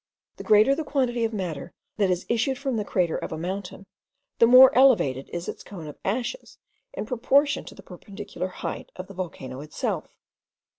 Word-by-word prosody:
The - - -7
greater 215 +4 +5
the 320 - -2
quantity 255 -5 0
of 225 - -2
matter 180 -5 -5 0.2
that 200 -3 +2
has 180 0 -1
issued 240 +3 0
from 270 -2 -2
the 215 - -1
crater 180 -4 0
of - - -6
a 160 - -4
mountain, 190 +3 -5 0.5
the 230 - +7
more 255 +2 +8
elevated 215 - +4
is 175 +1 -5
its - - -6
cone 180 -6 -9
of 150 - -10
ashes 240 - -3 0.4
in - - -4
proportion 270 +5 +2
to - - -11
the - - -13
perpendicular 195 +1 -7
height 185 - -6
of 185 - -7
the 195 - -12
volcano 160 -8 -6
itself. 150 +1 -4
205 Hz, 185 wpm, -25 LUFS, 180-250 Hz, 0.5 s, more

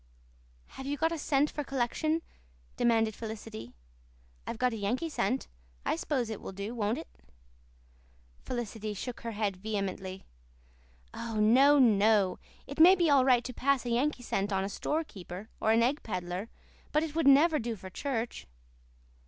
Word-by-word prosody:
"Have 265 - -6
you 290 +1 -2
got 325 +2 +1
a 335 - -2
cent 290 0 +2
for 295 - -3
collection?" 280 +5 -1 0.5
demanded 225 -2 +2
Felicity. 220 - -8 0.7
"I've 230 - -4
got 250 0 +1
a - - -3
Yankee 235 +10 -1
cent. 265 -3 -1 0.4
I - - +1
s'pose 245 - -1
it 215 - -6
will - - -7
do, 200 +4 -5
won't 220 -1 -1
it?" - - -7 1.3
Felicity 220 -3 -4
shook 245 +4 -6
her 230 -1 -5
head 205 -3 -1
vehemently. 190 -2 -4 0.9
"Oh, 230 -1 -5
no, 255 +7 +6
no. 210 -5 +4 0.3
It 280 +3 -8
may 355 +4 +9
be 340 -4 +2
all 275 -2 +6
right 250 -2 +4
to 250 - -6
pass 270 +1 +1
a 240 - -2
Yankee 250 +2 0
cent 200 -3 -1
on 190 -1 +1
a 195 - -3
store 305 +10 -1
keeper 190 - -9
or 220 - +2
an 230 +1 +4
egg 275 +5 +1
peddler, 185 +1 -4 0.4
but 305 +1 +2
it 315 -2 -4
would 325 -3 +1
never 300 +3 +6
do 235 0 -3
for 190 -2 -10
church." 240 0 -3
235 Hz, 170 wpm, -30 LUFS, 210-280 Hz, 1.3 s, may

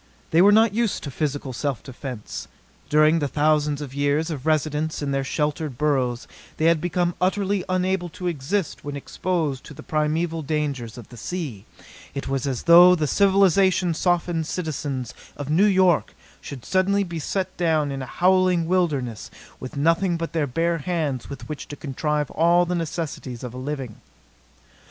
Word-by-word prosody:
They 165 - +5
were 200 +2 +7
not 220 0 +5
used 230 -1 0
to 140 - -5
physical 145 -2 -3
self 140 +1 -3
defense. 125 -4 -7 0.4
During 155 +2 +4
the 145 - 0
thousands 150 0 +1
of 135 -3 -7
years 145 +4 0
of 145 -1 -5
residence 155 0 0
in 140 - -1
their 135 0 0
sheltered 150 -1 -2
burrows 130 -5 0 0.3
they 155 - 0
had 165 -2 +4
become 175 0 0
utterly 195 +1 +1
unable 185 -1 0
to 180 - -6
exist 170 +3 -2
when 145 0 -5
exposed 150 -1 -2
to 150 - -11
the 155 - -10
primeval 160 +2 -1
dangers 140 -7 -3
of 120 - -11
the 120 - -12
sea. 130 - -5 0.5
It 140 - -4
was 135 0 -1
as 130 -3 -2
though 175 +2 +8
the 155 -3 0
civilization 190 -1 +3
softened 170 -1 0
citizens 145 - -3 0.2
of 145 0 -4
New 190 +7 +5
York 185 -4 +3 0.3
should 135 -5 -9
suddenly 200 +2 +2
be 170 -3 -5
set 185 +4 -2
down 155 -4 +1
in 135 -1 -4
a 130 - -6
howling 180 +1 +3
wilderness 150 - -1 0.3
with 130 +2 -8
nothing 165 +4 +2
but 165 0 -4
their 155 -3 0
bare 165 +5 0
hands 150 -5 -2
with 140 - -8
which 150 -2 -6
to 145 - -7
contrive 150 +1 -2
all 170 +2 +4
the 175 - -2
necessities 155 -7 -4
of 125 -2 -6
a - - -8
living. 130 -4 -5
155 Hz, 170 wpm, -23 LUFS, 140-175 Hz, 0.5 s, though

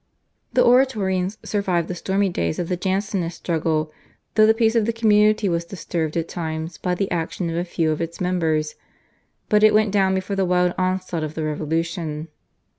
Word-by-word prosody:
The - - +4
Oratorians 210 -7 +2
survived 185 -5 0
the - - -3
stormy 195 +3 0
days 85 - -2
of 170 - -3
the 180 - +1
Jansenist 190 -2 -2
struggle 155 -2 -1 0.4
though 215 0 +5
the 220 - +6
peace 225 -1 +2
of 230 -2 +2
the 230 - +1
community 215 -2 +3
was 170 -2 0
disturbed 170 -3 -3
at 165 0 -1
times 160 -1 -5
by 180 0 -1
the 195 +1 -2
action 170 0 -2
of - - -3
a 170 - 0
few 165 -2 0
of 155 - -2
its 165 0 -5
members, 160 -4 0 0.7
but 210 0 +3
it 215 0 +6
went 215 -1 +3
down 190 -1 +2
before 190 +1 -2
the 195 - +1
wild 180 -1 +2
onslaught 185 -3 -1
of 155 0 -5
the 160 - -3
Revolution. 160 +1 -3
180 Hz, 190 wpm, -22 LUFS, 165-200 Hz, 0.7 s, the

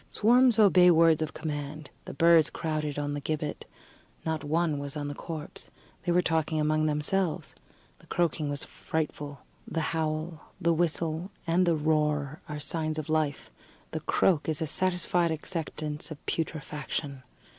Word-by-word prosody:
Swarms 245 +2 +4
obey 185 -4 +7
words 165 -2 +5
of 155 -1 -3
command: 150 -1 -5
the - - -7
birds 165 +1 +6
crowded 155 -3 -2
on 145 0 -1
the 145 - -2
gibbet; 150 +1 -3 0.6
not 160 -2 -1
one 155 0 +1
was 140 +1 -3
on 145 -1 -3
the - - -4
corpse. 155 +1 -6 0.3
They 175 - 0
were 180 +1 +4
talking 160 -1 +1
among 155 +1 +2
themselves. 155 +4 0 0.5
The - - -20
croaking 165 -3 0
was 145 -1 +1
frightful. 145 -3 -4 0.3
The 165 - -2
howl, 155 0 -3
the 170 -2 +3
whistle 165 +1 0 0.2
and 175 +2 +2
the 170 - +4
roar, 150 -1 0
are 150 0 -4
signs 155 +1 -2
of 155 0 -4
life; 155 -3 0 0.4
the - - -2
croak 165 -5 +2
is 155 0 0
a 160 - 0
satisfied 175 +1 +1
acceptance 155 -2 -4
of 155 - -7
putrefaction. 150 -3 -3
155 Hz, 155 wpm, -29 LUFS, 150-165 Hz, 0.6 s, obey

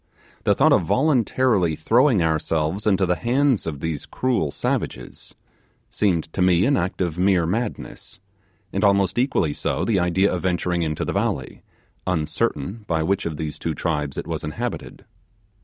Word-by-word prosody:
The - - +4
thought - - +4
of - - +4
voluntarily 125 - +2
throwing 115 - +3
ourselves 80 +4 -1
into 95 -2 +3
the 90 -1 0
hands 125 - +1
of 75 -4 -4
these 80 -3 -4
cruel 125 - 0
savages, 60 -2 -4 0.6
seemed 90 -6 +1
to - - -2
me 90 0 +4
an 140 +2 +3
act 95 -4 -2
of 85 -2 -2
mere 90 -2 +3
madness; 110 +6 -4 0.5
and 100 - -1
almost 100 +1 +3
equally 105 - +1
so - - -2
the 105 -5 +2
idea 90 +3 +2
of 90 - -2
venturing 90 0 0
into 75 -2 -2
the - - -2
valley, - - -2 0.5
uncertain 90 +3 -1
by 80 -1 0
which 95 +1 0
of 80 -3 -5
these 75 -1 -5
two 80 -2 -3
tribes 75 -4 -2
it - - -3
was - - -4
inhabited. 75 - -5
90 Hz, 160 wpm, -22 LUFS, 80-105 Hz, 0.6 s, The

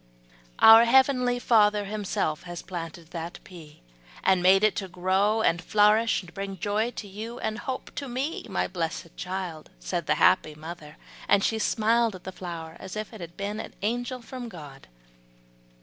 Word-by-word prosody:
"Our 225 +1 +9
heavenly 250 0 +4
Father 210 -4 +3
Himself 195 -6 -2
has 175 -1 -6
planted 165 -2 -7
that 170 +1 -6
pea, 160 - -14 0.4
and 190 -1 +3
made 190 +2 +5
it 215 +1 +2
grow 190 +4 +1
and 170 +1 +2
flourish, 215 +3 +3
to 170 - -13
bring 195 +2 -5
joy 210 +5 0
to 225 -3 -8
you 220 +5 -7
and 215 -1 -3
hope 260 +1 -5
to 280 - -3
me, 265 +6 -3
my - - 0
blessed 165 -1 -4
child," 180 -4 -5
said - - -3
the - - +3
happy 155 -1 +3
mother, 155 0 -10 0.3
and 200 -1 +4
she 225 - +1
smiled 225 0 +2
at 180 - -12
the 190 - -6
flower, 170 -3 -7
as 190 0 -8
if 215 +1 -5
it 220 - -10
had 170 0 -9
been 205 +2 -3
an - - -8
angel 245 +3 -2
from 245 +1 -7
God. 145 -8 -11
200 Hz, 170 wpm, -26 LUFS, 175-225 Hz, 0.4 s, Our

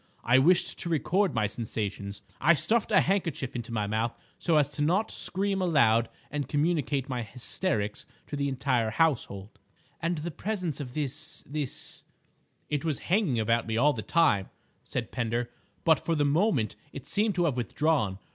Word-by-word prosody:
I 125 +2 +5
wished 175 +6 +3
to 170 - -3
record 180 +4 +1
my 110 -2 +2
sensations. 100 -2 -4 0.2
I 170 +5 +6
stuffed 220 +10 +1
a 195 - +6
handkerchief 165 -10 -1
into 120 0 -5
my 105 -3 0
mouth 110 +3 -1 0.2
so 165 -3 +2
as 145 -1 +1
not 180 +9 +2
to - - -7
scream 195 +1 -1
aloud 115 -10 +4 0.2
and 145 -3 -2
communicate 145 -3 0
my 125 -2 -2
hysterics 115 - -2 0.2
to - - -5
the 140 0 0
entire 125 -4 +1
household." 115 -8 0 0.4
"And 170 +1 0
the 165 +3 -4
presence 180 -3 -3
of 130 -3 -6
this—this—?" 150 -1 -4 0.7
"It 145 -2 -1
was 155 -5 0 0.2
hanging 185 - +3
about 115 +1 +1
me 110 0 -1
all 145 +5 +4
the 115 - -4
time," 110 - +2 0.3
said - - -4
Pender, 120 0 -1 0.3
"but 160 -1 +4
for 165 - 0
the 145 -1 +2
moment 145 - +2 0.2
it 140 - -8
seemed 210 +5 +1
to 175 -1 +2
have 145 -6 +1
withdrawn. 125 -4 0
140 Hz, 165 wpm, -28 LUFS, 115-165 Hz, 0.7 s, I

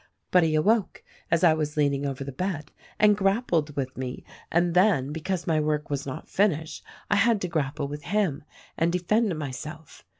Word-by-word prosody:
But 180 - +6
he 160 -2 +2
awoke, 205 +6 +1 0.3
as 165 +1 +2
I 165 -3 +7
was 155 -1 -3
leaning 140 -1 +1
over 135 0 -4
the 140 - -6
bed, 155 0 -4 0.3
and 210 -1 +5
grappled 195 - +1
with 130 -2 -3
me, 130 -1 -5 0.3
and 170 0 +2
then 180 -7 +3
— - - -5
because 175 +2 -3
my 160 -2 +2
work 150 -1 -1
was 140 0 -2
not 130 - -6
finished 160 -6 0 0.2
— - - -19
I 210 - +4
had 220 +1 +3
to 180 - -1
grapple 145 -3 -2
with 145 0 -7
him 185 -6 0 0.4
and 165 +1 +2
defend 180 +2 +1
myself. 150 +2 -7
160 Hz, 195 wpm, -26 LUFS, 145-185 Hz, 0.4 s, I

